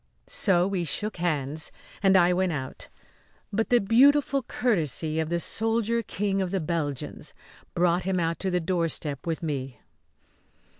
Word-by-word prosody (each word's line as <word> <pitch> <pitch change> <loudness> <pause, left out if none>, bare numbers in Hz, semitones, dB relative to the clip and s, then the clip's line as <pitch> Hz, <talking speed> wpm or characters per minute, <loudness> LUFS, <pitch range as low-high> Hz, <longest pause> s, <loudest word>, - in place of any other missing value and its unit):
So 180 -2 +2
we 190 -3 -1
shook 210 +6 -2
hands 155 -3 -1 0.3
and 195 -1 +5
I 180 0 +4
went 185 0 +1
out; 135 -4 -5 0.6
but 225 +2 0
the 245 - +5
beautiful 275 +6 +4
courtesy 160 - 0
of 160 -1 -1
the 170 0 0
soldier 225 +4 0
King 195 -2 -1
of 185 - -1
the 195 +1 -1
Belgians 155 -4 -3 0.4
brought 175 0 +2
him 185 0 -1
out 165 -1 -1
to 190 - -1
the 180 -1 +1
doorstep 165 -4 -1
with 165 0 -2
me. 135 -5 -3
175 Hz, 150 wpm, -26 LUFS, 160-200 Hz, 0.6 s, and